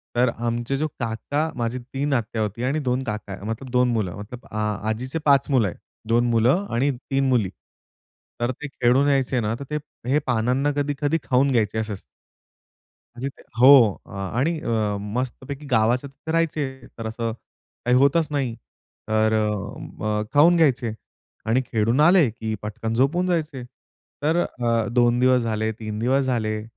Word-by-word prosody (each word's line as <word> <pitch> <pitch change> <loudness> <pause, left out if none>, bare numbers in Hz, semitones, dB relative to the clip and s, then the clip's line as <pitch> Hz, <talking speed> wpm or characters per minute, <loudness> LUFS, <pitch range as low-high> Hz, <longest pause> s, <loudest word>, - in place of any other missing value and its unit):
तर 125 +1 +4
आमचे 120 +3 -2
जो 155 +2 0
काका 125 +7 -2
माझी 120 0 -2
3 135 +3 -3
आत्या 115 -3 -1
होती 110 +3 -3
आणि 135 +5 0
2 130 -2 -1
काका 105 -4 -5
मतलब 115 +4 -5
2 125 0 +3
मुलं 100 -6 -1
मतलब 115 +5 -9
आ 110 - -3 0.3
आजीचे 130 +8 -2
5 140 -1 +4
मुलं 125 -6 +3
आहे, 90 - -5 0.3
2 120 +2 +3
मुलं 125 - +3
आणि 135 +4 +2
3 135 +1 -1
मुली. 115 -7 +2 0.9
तर 120 +1 0
ते 150 +4 -7
खेळून 135 0 +2
यायचे 135 -2 +1
ना 110 -1 -1
तर - - -5
ते 150 - 0 0.3
हे 145 - +4
पानांना 125 +5 +1
कधी-कधी 145 +2 0
खाऊन 135 +2 +2
घ्यायचे 110 -3 +1
असंच. 105 -3 -4 1.1
म्हणजे 130 +3 -3
ते - - -16 0.2
हो. 125 -6 +8
आणि 120 - -2
अ, 110 -7 0
मस्तपैकी 130 +6 -4
गावाच्या 120 +4 +2
तिथे 160 +3 -7
राहायचे 150 -6 -1
तर 115 -1 -4
असं 115 0 -3 0.5
काही 125 +1 +4
होतच 140 +4 +3
नाही 135 -5 -1 0.6
तर 110 0 +2
अ, 105 0 -2
खाऊन 160 +4 +6
घ्यायचे 130 -7 +2 0.5
आणि 115 +4 +2
खेळून 115 +3 +1
आले, 170 -3 +6
की 110 0 -5
पटकन 110 +2 -4
झोपून 155 +9 +2
जायचे. 155 -7 -1 0.6
तर 160 +3 +2
अ, 115 -8 0
2 120 0 +3
दिवस 125 0 +4
झाले, 110 -1 -1
3 110 -1 -6
दिवस 130 +3 +2
झाले, 110 -4 -1
125 Hz, 160 wpm, -23 LUFS, 110-140 Hz, 1.1 s, हो